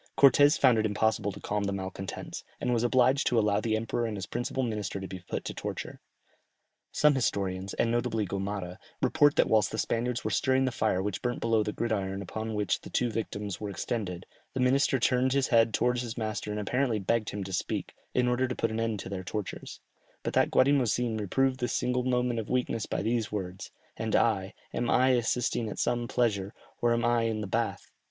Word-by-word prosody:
Cortès 145 +3 +6
found 125 -5 +5
it 110 - +1
impossible 105 -1 +1
to - - -10
calm 105 0 -2
the 100 - -1
malcontents, 95 0 -5 0.2
and 125 - 0
was 115 - +2
obliged 130 +3 +3
to 120 - +2
allow 105 -1 +3
the 110 0 0
emperor 115 +1 -1
and 105 -2 -4
his 95 - -4
principal 120 +2 -2
minister 105 -5 -3
to 95 - -6
be 95 - -7
put 90 - -5
to - - -4
the - - -8
torture. - - -5 0.9
Some 150 0 +4
historians, 95 -7 -1
and 115 - +1
notably 120 -2 0
Gomara, 95 -1 -4 0.2
report 145 -2 +4
that - - +4
whilst 110 -3 +3
the 110 - -4
Spaniards 120 +2 -1
were - - -2
stirring 130 0 +2
the 130 - 0
fire 105 -5 0
which 100 -4 -3
burnt 120 0 -2
below 115 -1 +2
the 105 - -1
gridiron 100 -4 -2
upon 110 +3 -4
which 105 -2 0
the - - -10
two 120 -1 0
victims 105 -3 -4
were 105 - -3
extended, 95 -3 -3 0.3
the - - -1
minister 135 +2 +3
turned 125 +2 +2
his 140 -1 +1
head 115 -2 +4
towards 125 +2 +1
his 120 -1 -6
master 110 -2 -3
and 105 0 -2
apparently 125 +3 0
begged 110 +2 0
him 100 -1 -4
to 95 0 -7
speak, - - -2 0.2
in 125 -1 +3
order 125 +1 +1
to 125 - -3
put 115 - 0
an 110 - -2
end 115 -2 -1
to - - -7
their 95 -1 -4
tortures; 100 +1 -6 0.4
but - - -2
that - - +3
Guatimozin 125 -4 +2
reproved 130 +6 +1
this 125 - -1
single 125 0 0
moment 125 -2 +1
of 110 - -5
weakness 125 -3 -1
by - - -2
these 115 -1 0
words, 95 -3 -5 0.3
"And - - -1
I, - - +1 0.2
am 120 - -1
I 130 +1 +4
assisting 120 -2 +1
at - - -6
some 120 0 0
pleasure, 105 -6 0 0.3
or 120 - +3
am 115 0 +1
I 120 -1 +2
in 110 -1 -1
the - - -3
bath?" - - -2
115 Hz, 215 wpm, -29 LUFS, 105-125 Hz, 0.9 s, Cortès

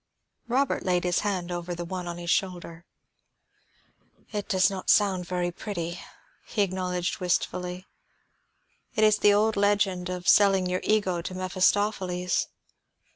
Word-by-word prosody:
Robert 260 +3 0
laid 180 -1 +1
his 180 0 +1
hand 185 -4 -2
over 175 0 -4
the 175 0 -5
one 180 0 -5
on 170 0 -5
his 170 -1 -3
shoulder. 175 -3 -2 1.5
"It 210 -1 -4
does 190 -3 +4
not 190 -2 -4
sound 190 -4 +3
very 180 -1 -1
pretty," 175 -2 -5 0.5
he 210 - +1
acknowledged 180 -2 -2
wistfully. 180 0 -2 1.1
"It 220 - +2
is 215 -1 +4
the 205 - +5
old 215 +1 +2
legend 200 -3 +1
of 180 -1 -5
selling 195 -2 +5
your 180 0 -1
ego 190 -5 +1
to 185 +2 -6
Mephistopheles. 185 -1 0
185 Hz, 135 wpm, -26 LUFS, 180-205 Hz, 1.5 s, the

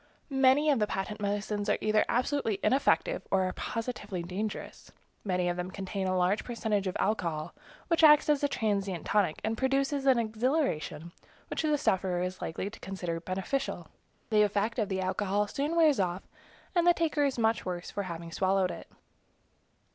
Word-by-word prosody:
Many 270 +3 +4
of 275 - +2
the 210 - +2
patent 205 +2 -4
medicines 205 0 -2
are - - +3
either 215 0 +3
absolutely 245 -4 0
ineffective 280 - +2
or 190 -1 +2
are 185 0 -1
positively 215 -6 -4
dangerous. 195 +5 -5 0.3
Many 180 -3 0
of 175 0 -1
them 180 +1 -3
contain 190 0 -4
a 185 0 +1
large 185 +4 +2
percentage 220 -5 -1
of 185 - -2
alcohol, 170 -8 -1 0.3
which 335 -1 +2
acts 300 -1 +7
as 295 -1 +2
a - - +4
transient 200 - -1
tonic, 200 -7 +1
and 220 +1 -2
produces 275 +1 +1
an 260 -2 +6
exhilaration 220 - -1 0.4
which - - -1
the 305 -2 +2
sufferer 185 -7 0
is 185 0 -4
likely 165 +4 -3
to 205 - -9
consider 175 -3 -4
beneficial. 190 +10 -3 0.4
The 215 -1 +5
effect 210 +3 +1
of 210 - 0
the 190 -1 -1
alcohol 200 +2 0
soon 285 +9 -2
wears 315 -6 +4
off, 180 0 -1 0.5
and 345 -2 +2
the 350 - +6
taker 315 -3 +1
is 275 -3 0
much 225 -1 +1
worse 175 -1 -5
for 205 - -3
having 170 -3 -6
swallowed 190 +1 +1
it. - - -9
210 Hz, 175 wpm, -30 LUFS, 185-265 Hz, 0.5 s, acts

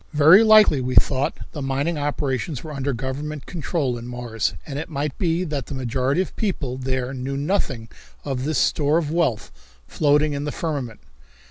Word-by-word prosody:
Very 155 +7 +7
likely, 215 -10 +6
we 125 0 -2
thought, 135 0 +3
the 150 - -6
mining 140 +5 -1
operations 145 -1 -2
were 155 - -7
under 140 0 -2
government 135 +4 -4
control 150 -7 -2
in 120 - -8
Mars 120 -3 -3
and 140 -1 -5
it 160 - -6
might 145 -2 -3
be 170 0 +1
that 145 -7 -4
the 140 - -5
majority 130 +5 0
of 190 - -3
the - - -23
people 155 - -1
there 130 0 -2
knew 135 +1 -4
nothing 140 - -1 0.4
of 135 -3 -2
this 155 0 -1
store 150 +1 +2
of 155 -3 -1
wealth 160 -10 0 0.4
floating 150 0 +2
in 140 0 -3
the 150 - -2
firmament. 140 -10 -4
140 Hz, 185 wpm, -23 LUFS, 130-155 Hz, 0.4 s, Very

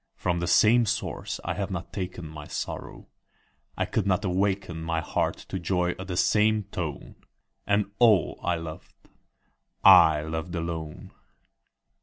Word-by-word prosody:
From 85 -1 -1
the 85 - -2
same 115 +5 +5
source - - -3
I - - -2
have 100 0 -3
not 90 -3 -6
taken 90 -4 -5
My 75 -1 -9
sorrow; - - -6 0.7
I - - 0
could 100 -3 -1
not 100 +2 +1
awaken 95 -2 -1
My 80 0 -1
heart 80 - -1
to 95 - -3
joy 90 0 0
at 95 - -7
the 90 -2 -4
same 105 +2 +3
tone; 80 -5 -5 0.5
And 100 0 +1
all 110 - +4
I 90 - 0
loved, 80 -1 -8 0.9
I 80 -2 +8
loved 80 +3 -4
alone. 80 -2 -5
90 Hz, 145 wpm, -26 LUFS, 80-100 Hz, 0.9 s, I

